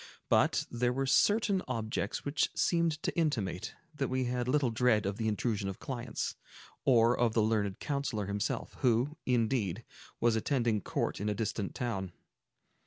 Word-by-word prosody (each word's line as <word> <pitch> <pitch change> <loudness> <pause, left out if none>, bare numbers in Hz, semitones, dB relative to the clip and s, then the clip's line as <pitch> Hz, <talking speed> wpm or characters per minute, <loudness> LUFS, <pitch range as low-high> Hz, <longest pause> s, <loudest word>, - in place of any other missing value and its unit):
But - - +3
there 120 +1 +1
were 135 +2 -1
certain 200 +7 +3
objects 110 -4 -2
which 145 +1 +1
seemed 170 -2 +2
to - - -1
intimate 110 - -1 0.2
that 140 -3 -1
we 130 0 0
had 125 0 -1
little 130 -2 +2
dread 110 -2 +3
of 100 +1 -2
the 110 - -1
intrusion 105 -2 -1
of 95 - -6
clients, 120 -3 -4 0.5
or 120 -2 +5
of 120 -2 +1
the 110 - +4
learned 105 -3 0
counsellor 135 -8 -2
himself, 100 +1 -3
who, 125 +5 +2
indeed, 115 -5 +1 0.4
was 115 -1 +3
attending 115 -2 +1
court - - -2
in 105 - 0
a 105 - -1
distant 105 -1 -3
town. 95 -7 -3
120 Hz, 160 wpm, -31 LUFS, 105-130 Hz, 0.5 s, or